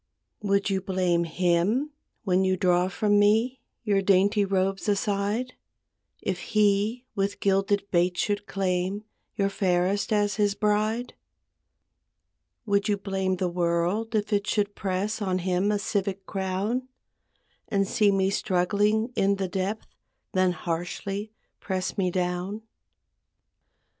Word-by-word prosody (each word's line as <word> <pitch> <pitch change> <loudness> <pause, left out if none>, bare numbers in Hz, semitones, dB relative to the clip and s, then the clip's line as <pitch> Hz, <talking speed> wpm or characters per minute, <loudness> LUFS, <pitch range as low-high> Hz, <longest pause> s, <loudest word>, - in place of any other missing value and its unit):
Would 200 -1 +1
you 190 -1 0
blame 185 -3 +1
him, 180 - +1 0.3
when 190 -2 +2
you 185 0 +1
draw 180 0 +3
from 205 +2 +2
me 225 +5 +3 0.2
Your 200 -3 +2
dainty 200 +2 +3
robes 195 +1 0
aside, 205 +4 0 0.7
If 185 -2 -2
he 215 +4 +1
with 200 0 -1
gilded 200 +1 +2
baits 175 0 +2
should 205 0 -1
claim 190 +1 -1 0.3
Your 195 - +1
fairest 190 +2 0
as 205 -1 +1
his 205 -1 +2
bride? 215 +3 0 1.5
Would 200 0 +1
you 205 - +2
blame 190 -1 -1
the 185 0 -1
world 175 +6 0
if 215 0 0
it 205 0 +1
should 205 -1 0
press 200 +3 -2
On 185 -2 0
him 185 +2 +1
a 210 - +1
civic 195 -1 -2
crown; 195 +6 -2 0.8
And 195 -1 +1
see 205 0 +3
me 195 0 +2
struggling 205 +5 +1
in 200 +1 +2
the 195 -1 -2
depth 190 +4 -3 0.5
Then 185 -1 +2
harshly 180 +5 -4 0.3
press 185 -2 -3
me 190 -3 +1
down? 180 +4 -2
195 Hz, 130 wpm, -26 LUFS, 185-210 Hz, 1.5 s, draw